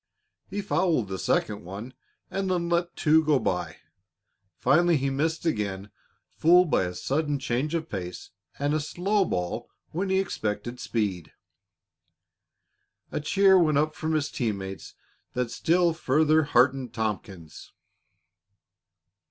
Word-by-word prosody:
He 200 +1 -3
fouled 160 - +1
the 95 -1 -4
second 105 0 0
one, 100 +8 -8 0.4
and 195 -1 -2
then 175 -2 0
let 175 0 0
two 160 0 +4
go 150 -2 +3
by. 90 -8 -2 0.8
Finally 170 - +4
he 135 0 -1
missed 160 +5 -1
again, 105 - -2 0.4
fooled 175 0 +4
by 95 - +3
a 90 0 -5
sudden 145 - -1
change 140 +4 -1
of 160 -1 -2
pace 90 -3 -6 0.3
and 145 +1 0
a 155 - +2
slow 190 +6 0
ball 90 - -3 0.2
when 190 +4 -2
he 190 - +2
had 195 - +2
expected 120 - -4
speed. 100 -7 -2 1.8
A - - -2
cheer 190 +5 +4
went 155 -4 +3
up 155 +1 +1
from 155 0 -2
his 150 -1 -1
team 110 -5 -1
mates 95 0 -8 0.4
that 125 -2 -2
still 170 +4 +2
further 155 0 +2
heartened 130 -1 +2
Tompkins. 100 -7 -5
145 Hz, 135 wpm, -26 LUFS, 105-170 Hz, 1.8 s, two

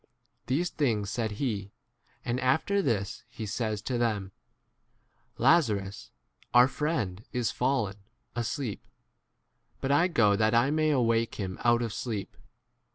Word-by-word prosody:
These 165 +7 0
things 110 -9 0
said 110 -1 -2
he; 105 -4 -3 0.5
and 120 +1 -1
after 160 +11 +2
this 115 - -1
he 115 -2 -6
says 105 0 -2
to 125 +2 -1
them, 105 -5 0 1.1
Lazarus, 110 - +2 0.5
our 125 +1 +8
friend, 110 - -2
is 125 -2 0
fallen 105 -7 0 0.4
asleep; 120 -1 -3 0.9
but 135 - -1
I 145 +5 +4
go 115 - +3
that 110 +2 +2
I 120 +4 +4
may 155 0 +2
awake 115 -5 +2
12 95 -3 -3
him - - -9
out 120 0 +4
of 115 -3 -3
sleep. 110 -5 -4
115 Hz, 135 wpm, -29 LUFS, 105-135 Hz, 1.1 s, our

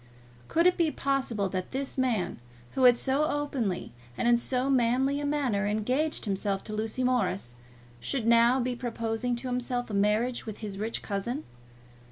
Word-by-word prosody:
Could 335 +1 +2
it 360 - +5
be 335 -2 +3
possible 265 -8 -1
that 185 -1 -3
this 270 +1 -3
man, 245 -8 0 0.3
who 260 - +2
had 245 -1 +7
so 270 +5 +1
openly 285 -10 -2 0.3
and - - 0
in 240 - +6
so 250 +2 0
manly 265 +2 +2
a 290 - -2
manner 255 -9 0
engaged 250 +10 0
himself 195 -1 -1
to 215 - -7
Lucy 220 +4 -2
Morris, 195 - 0 0.4
should 220 - -2
now 235 +2 +5
be 250 0 -1
proposing 235 0 -2
to 240 +2 -5
himself 245 -1 -2
a - - -5
marriage 210 +5 +1
with 215 - -5
his 205 -3 -6
rich 220 +2 -3
cousin? 235 +8 -3
240 Hz, 170 wpm, -28 LUFS, 215-265 Hz, 0.4 s, had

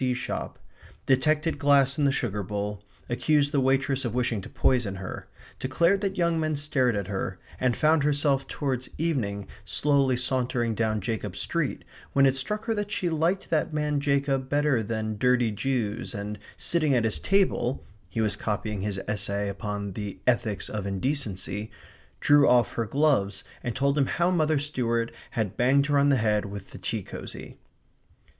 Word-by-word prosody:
B.C. 125 -1 +1
shop; 125 - -4 0.5
detected 150 +5 +2
glass 140 -1 +4
in 145 - +3
the 140 - +4
sugar 105 -6 -1
bowl; 105 +1 -4 0.2
accused 145 +3 +2
the 145 - +2
waitress 135 0 +1
of 120 -2 -3
wishing 120 -4 0
to - - -10
poison 120 -7 +1
her; 95 -1 -7 0.3
declared 170 +9 +2
that 195 -1 -2
young 170 -2 +2
men 155 -1 0
stared 140 -5 +1
at 100 -2 -1
her; 95 0 -3 0.2
and 125 -2 +1
found 155 0 +4
herself 145 -1 +1
towards 130 -3 -3
evening 110 - -1 0.2
slowly 140 -3 +2
sauntering 125 -2 0
down 110 -1 0
Jacob's 105 -2 -3
street, 165 -5 -1 0.3
when 135 0 +5
it 135 -1 +4
struck 210 +12 -2
her 225 - +1
that 205 -1 -3
she 175 -4 -1
liked 165 +5 0
that 155 -1 +1
man 150 -1 0
Jacob 140 -2 0
better 145 -4 +2
than 110 -1 -3
dirty 125 -2 +3
Jews, 115 -1 -2
and 105 +1 -5 0.2
sitting 155 -5 +2
at 120 - +2
his 110 - -1
table 190 -10 +1 0.2
(he 110 +5 -2
was 105 -2 +1
copying 105 -1 -3
his 100 -1 -2
essay 100 -1 -2
upon 100 0 -4
the 100 -1 -5
Ethics 110 -5 +1
of 100 -2 -4
Indecency), 105 -2 -2 0.5
drew 145 -1 +5
off 125 -1 +4
her 115 - -1
gloves 130 -9 +1 0.2
and 120 -3 -3
told 140 +2 +2
him 135 - +3
how 175 +2 +1
Mother 155 -3 +2
Stuart 120 -5 -1 0.2
had 105 -3 -1
banged 135 +3 +3
her 145 -1 +2
on 140 0 +4
the 140 - +5
head 105 -3 +1
with 100 -1 -8
the - - -9
tea - - -3
cosy. - - -9
130 Hz, 175 wpm, -27 LUFS, 105-145 Hz, 0.5 s, when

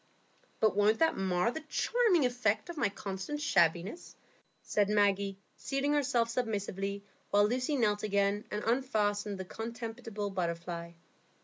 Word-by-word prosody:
"But 215 -3 +3
won't 210 +2 +4
that 325 - +3
mar 190 +3 +1
the 315 - -4
charming 370 - +2
effect 245 - 0
of 345 - -6
my 230 -8 +2
consistent 195 +8 -5
shabbiness?" 190 - +1 0.5
said 205 -1 +1
Maggie, 200 -1 +2 0.2
seating 275 +1 -1
herself 250 -5 +2
submissively, 200 -4 -2 0.3
while 205 0 +4
Lucy 255 +5 0
knelt 210 -5 +2
again 200 0 +1
and 210 0 -3
unfastened 215 -5 0
the 190 - -5
contemptible 225 -1 -5
butterfly. 170 -2 -3
210 Hz, 130 wpm, -31 LUFS, 200-245 Hz, 0.5 s, won't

